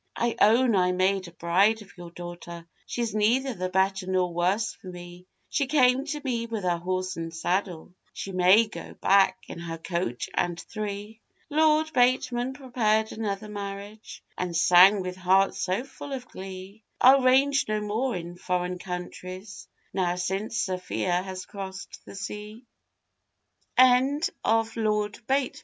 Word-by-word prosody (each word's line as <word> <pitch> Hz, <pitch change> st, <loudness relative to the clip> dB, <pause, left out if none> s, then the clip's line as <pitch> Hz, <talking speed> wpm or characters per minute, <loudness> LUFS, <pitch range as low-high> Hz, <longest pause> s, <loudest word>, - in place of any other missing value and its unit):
'I 235 Hz, -1 st, 0 dB
own 230 Hz, +1 st, +5 dB
I 180 Hz, -1 st, +3 dB
made 185 Hz, 0 st, +1 dB
a -, -, -11 dB
bride 195 Hz, +6 st, +2 dB
of 200 Hz, -, -19 dB
your 175 Hz, -2 st, -10 dB
daughter, 175 Hz, -1 st, -9 dB, 0.2 s
She's 235 Hz, -3 st, -2 dB
neither 240 Hz, +5 st, +2 dB
the 185 Hz, -3 st, -3 dB
better 190 Hz, 0 st, +1 dB
nor 185 Hz, -2 st, 0 dB
worse 185 Hz, +5 st, 0 dB
for -, -, -15 dB
me; 175 Hz, 0 st, -10 dB, 0.2 s
She 280 Hz, -2 st, 0 dB
came 260 Hz, -2 st, +3 dB
to 300 Hz, 0 st, -3 dB
me 235 Hz, -3 st, -1 dB
with 225 Hz, -3 st, -4 dB
her 175 Hz, -1 st, 0 dB
horse 185 Hz, +1 st, -2 dB
and 165 Hz, 0 st, -4 dB
saddle, 175 Hz, +1 st, -2 dB, 0.2 s
She 195 Hz, -, -6 dB
may 185 Hz, +5 st, +5 dB
go 215 Hz, -, -9 dB
back 190 Hz, -1 st, +3 dB
in -, -, -8 dB
her 165 Hz, -1 st, -5 dB
coach 165 Hz, -8 st, -3 dB
and 175 Hz, -1 st, -1 dB
three.' 210 Hz, +1 st, -6 dB, 0.3 s
Lord 315 Hz, +1 st, +3 dB
Bateman 250 Hz, 0 st, +2 dB
prepared 225 Hz, -5 st, 0 dB
another 215 Hz, -1 st, -4 dB
marriage, 205 Hz, +1 st, -8 dB
And 180 Hz, -2 st, -3 dB
sang, 185 Hz, +4 st, +7 dB
with 180 Hz, 0 st, -5 dB
heart 190 Hz, +1 st, +3 dB
so 185 Hz, +6 st, -1 dB
full 275 Hz, +1 st, -9 dB
of 250 Hz, -2 st, -6 dB
glee, 190 Hz, +2 st, -9 dB, 0.2 s
I'll 265 Hz, +2 st, +7 dB
range 270 Hz, +2 st, +4 dB
no 215 Hz, 0 st, 0 dB
more 220 Hz, +5 st, -1 dB
in 175 Hz, 0 st, -6 dB
foreign 180 Hz, 0 st, -2 dB
countries, 185 Hz, +2 st, -7 dB, 0.3 s
Now 180 Hz, -2 st, 0 dB
since 195 Hz, +5 st, -2 dB
Sophia 180 Hz, -1 st, -1 dB
has 185 Hz, -1 st, -7 dB, 0.6 s
c 210 Hz, +4 st, -7 dB
195 Hz, 140 wpm, -26 LUFS, 180-225 Hz, 0.6 s, sang